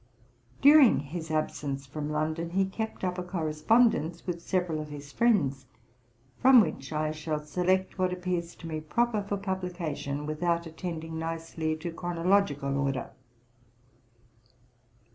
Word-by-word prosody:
During 285 -3 +8
his 160 +3 -6
absence 145 -3 -2
from 145 +2 -5
London 155 +2 -1
he 190 +2 +2
kept 220 +3 -5
up 180 0 -1
a - - -2
correspondence 170 +1 +1
with 175 -2 -3
several 175 -3 -1
of 150 - -8
his 145 -1 -9
friends, 145 - +2 0.7
from 260 -1 +8
which 140 -10 0
I 155 0 0
shall 155 0 -3
select 180 +5 0
what 185 -1 +2
appears 180 -2 -3
to 165 - -9
me 155 -1 -4
proper 220 +8 +1
for 200 0 -3
publication, 175 -7 -3
without 170 +2 0
attending 160 -1 -5
nicely 165 -1 -3
to 170 +2 -5
chronological 170 -5 +1
order. 135 -2 -1
165 Hz, 130 wpm, -29 LUFS, 155-185 Hz, 0.7 s, During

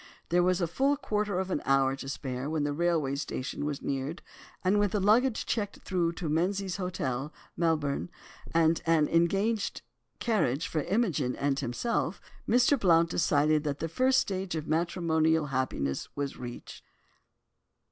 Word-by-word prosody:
There 175 +1 +3
was 180 +1 +2
a - - +3
full 270 - +1
quarter 210 -7 -1
of 190 0 -2
an 150 - 0
hour 135 0 +3
to 135 - -7
spare 130 -1 -4
when 155 -2 0
the 145 0 -1
railway 160 -3 +1
station 140 0 -4
was 145 -2 -3
neared, 140 +4 -3 0.4
and 195 +3 +3
with 205 -2 +1
the 210 - +2
luggage 225 +5 +3
checked 205 -3 -2
through 175 -3 0
to 170 -1 -5
Menzies 185 +5 0
Hotel, 150 -7 -3 0.2
Melbourne, 160 -2 0 0.4
and 165 -1 +3
an 160 -2 +4
engaged 195 +6 +1 0.3
carriage 165 - 0
for 160 -2 -1
Imogen 180 - 0
and 140 0 0
himself, 165 - -1 0.3
Mr. 250 +4 +4
Blount 170 -4 +4
decided 150 -2 +2
that 145 -2 -2
the 165 - -3
first 255 +10 +2
stage 190 -2 -1
of 155 -1 -3
matrimonial 160 -1 +1
happiness 70 - -1
was 140 -1 -3
reached. 120 -1 -8
165 Hz, 155 wpm, -29 LUFS, 145-195 Hz, 0.4 s, an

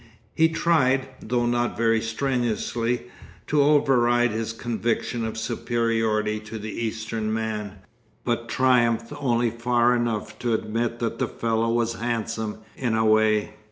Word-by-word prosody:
He 160 0 +4
tried, 135 -6 +2
though 120 +1 -1
not 120 0 0
very 115 -1 +2
strenuously, 120 0 -1 0.4
to 150 -1 +2
override 125 -5 +4
his 110 +1 -2
conviction 115 0 -2
of 110 0 -4
superiority 115 -2 0
to 110 +1 -8
the 110 0 -6
Eastern 110 -1 -3
man, 110 -2 -3 0.5
but 120 -1 -1
triumphed 120 -2 +2
only 120 -4 +1
far 120 +1 +2
enough 110 -3 -2
to 120 -2 +1
admit 115 +2 -2
that 115 -1 -3
the - - +1
fellow 115 0 -1
was 115 0 +1
handsome 115 -2 -2
in 120 -4 -1
a 110 0 +2
way. 110 -1 +3
115 Hz, 135 wpm, -25 LUFS, 110-120 Hz, 0.5 s, He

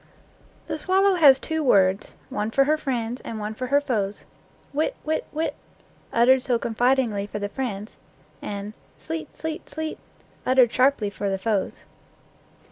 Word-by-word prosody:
The 310 - -4
swallow 385 +4 +3
has 295 -7 +7
two 320 +2 -2
words, 195 -5 +3 0.2
one 210 +1 -1
for 275 +4 +4
her 300 +3 +3
friends, 245 -5 -3
and 225 - -6
one 210 +1 -4
for 255 +3 -4
her 280 +3 +4
foes, 215 -8 -2 0.5
"Wit, 310 - 0
wit, 315 +1 -1
wit," 315 +2 -1 0.6
uttered 255 +3 +5
so 250 -2 +1
confidingly 235 -3 +1
for 210 - -5
the 205 0 -2
friends, 210 -3 -5 0.4
and 205 +1 -5 0.2
"Sleet, 320 0 -6
sleet, 320 +2 -5
sleet," 315 0 -5 0.4
uttered 255 -2 +4
sharply 255 -5 +3
for 200 0 -3
the 195 - 0
foes. 205 0 -1
250 Hz, 150 wpm, -24 LUFS, 210-300 Hz, 0.6 s, has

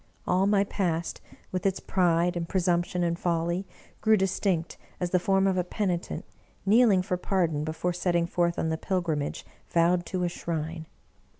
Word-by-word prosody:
All 190 +2 +2
my 200 -1 +4
past, 170 -5 -2 0.3
with 185 -1 -2
its 195 -1 +1
pride 175 -1 +2
and 170 -1 -3
presumption 175 -1 +1
and 170 0 0
folly, 170 +2 -1 0.3
grew 220 0 +5
distinct 190 -3 0 0.2
as 180 -1 -2
the 180 - +4
form 195 +2 +2
of 190 -1 +2
a - - +1
penitent, 180 -1 -2 0.4
kneeling 205 -2 +5
for 180 0 -1
pardon 170 -5 0
before 160 +3 -2
setting 175 -1 +1
forth 170 0 0
on 160 - 0
the 160 - -1
pilgrimage 170 -7 -2 0.2
vowed 175 +1 +2
to 185 -1 -2
a - - +2
shrine. 160 -1 -4
175 Hz, 165 wpm, -27 LUFS, 170-190 Hz, 0.4 s, grew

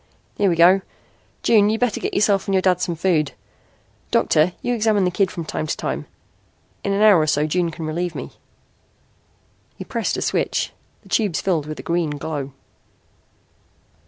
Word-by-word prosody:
Here 200 -1 +2
we 170 - +1
go. 180 +4 +6 0.6
June, 210 -3 +4
you'd 220 +1 0
better 245 -4 +1
get - - -3
yourself 200 -1 +2
and 195 - +1
your 190 - +3
dad 185 -2 +2
some 170 - -1
food. 160 -4 +1 0.8
Doctor, 155 +4 +2
you 245 - 0
examine 215 -4 +2
the 180 - +1
kid 190 +1 +1
from 170 -3 -6
time 155 0 -3
to - - -2
time. - - -4 0.8
In 200 - -1
an 200 +2 +2
hour 210 -5 +7
or 155 - +1
so 150 0 +2
June 170 +2 0
can 165 0 -7
relieve 170 +2 -3
me." - - -6 1.4
He - - -7
pressed - - -2
a - - -2
switch. - - -1 0.3
The - - -18
tubes 205 -7 +1
filled 165 -6 -1
with 155 - -6
a - - -7
green 170 -2 0
glow. 145 -3 -4
180 Hz, 180 wpm, -21 LUFS, 160-200 Hz, 1.4 s, hour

